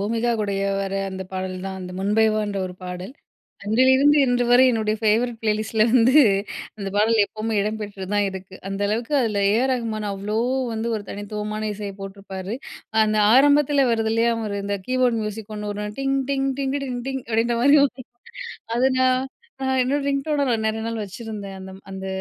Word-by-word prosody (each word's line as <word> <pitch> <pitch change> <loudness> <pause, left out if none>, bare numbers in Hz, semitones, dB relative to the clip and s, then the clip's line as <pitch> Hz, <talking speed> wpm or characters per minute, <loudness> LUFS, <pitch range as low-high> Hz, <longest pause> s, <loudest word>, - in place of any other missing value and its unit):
பூமிகா 230 +3 0
கூடயே 200 -1 -1
வர 195 0 -3 0.2
அந்த 190 0 -5
பாடல் 185 0 -3
தான். 190 0 -5
அந்த 180 0 -7
முன்பே 210 +3 +3
வான்ற 210 -2 -2
ஒரு 180 - -8
பாடல். 180 +6 -6 0.5
அன்றிலிருந்து 260 +7 +4
இன்றுவரை 245 0 +4
என்னுடைய 215 -2 0
ஃபேவரட் 225 +2 +2
ப்ளேலிஸ்ட்ல 215 0 +1
வந்து 250 +1 +5 0.6
அந்த 195 -1 -4
பாடல் 220 +1 +3
எப்பவுமே 220 +2 -4
இடம்பெற்று 205 -2 -4
தான் 205 0 +3
இருக்கு. 190 0 -9
அந்த 195 0 -4
அளவுக்கு 230 +6 -2
அதில 210 -4 0
ஏ. - - +3
ஆர். 265 - +1
ரகுமான் 225 -4 -2
அவ்ளோ 205 +2 -3 0.3
வந்து 225 +1 -2
ஒரு 210 - -5
தனித்துவமான 210 +1 -4
இசைய 205 -1 -6
போட்டுருப்பாரு. 195 0 -6 0.5
அந்த 215 0 +1 0.2
ஆரம்பத்தில 285 0 +5
வருது 225 -1 +1
இல்லையா, 230 +1 +2
ஒரு 200 - -3
இந்த 200 0 -1
கீபோர்ட் 255 -2 +2
மியூசிக் 215 0 -6
1 210 0 -4
வரும். 210 0 -5
"டிங் 270 0 +1
டிங் 270 0 0
டிங்கிட்டிட்ட 275 0 -2
டிங் 245 -1 -4
டிங்" 265 -1 -3
அப்படின்ற 230 +1 +1
மாரி. 285 +2 +6 1.0
அத 250 - +1 0.2
நான் 255 0 +3 0.4
நான் 265 0 +1
என்னோட 275 +3 0
ரிங்டோன 285 +1 0
நான் 225 -2 0
நெறைய 220 0 -2
நாள் 230 -1 -3
வச்சிருந்தேன், 205 -1 -7
அந்தம் 190 0 -10
அந்த 190 0 -6
220 Hz, 170 wpm, -23 LUFS, 200-245 Hz, 1.0 s, மாரி